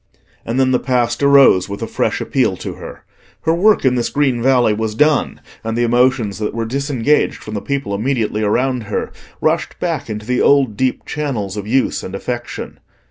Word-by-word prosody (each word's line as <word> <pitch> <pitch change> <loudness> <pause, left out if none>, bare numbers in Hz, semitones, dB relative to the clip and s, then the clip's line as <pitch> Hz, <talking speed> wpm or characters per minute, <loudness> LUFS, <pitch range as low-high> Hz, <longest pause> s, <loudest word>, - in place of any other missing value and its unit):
And 115 +3 -1
then 130 -1 +3
the 125 - +2
past 120 -2 0
arose 140 -10 +5
with 100 +3 -5
a - - -3
fresh - - -1
appeal - - 0
to - - -6
her. - - -10 0.4
Her 160 - +1
work 200 0 +3
in 130 - +4
this 120 -2 0
green 135 -5 0
valley 125 -3 +3
was 110 0 -3
done, 150 +2 +1 0.2
and 115 0 -3
the 120 - +2
emotions 120 -3 +1
that 105 0 -3
were 115 -1 -2
disengaged 140 +2 0
from 110 - -8
the 105 - -3
people 140 -8 -3
immediately 110 -1 -1
around 125 +3 0
her 105 - -3 0.3
rushed - - 0
back 160 -7 -2
into 105 0 -5
the 125 +1 0
old 135 -6 +3
deep 130 +3 -1
channels 120 -10 -3
of 105 -1 -5
use 130 +4 +1
and 95 - -7
affection. 120 +4 -5
125 Hz, 190 wpm, -18 LUFS, 110-135 Hz, 0.4 s, arose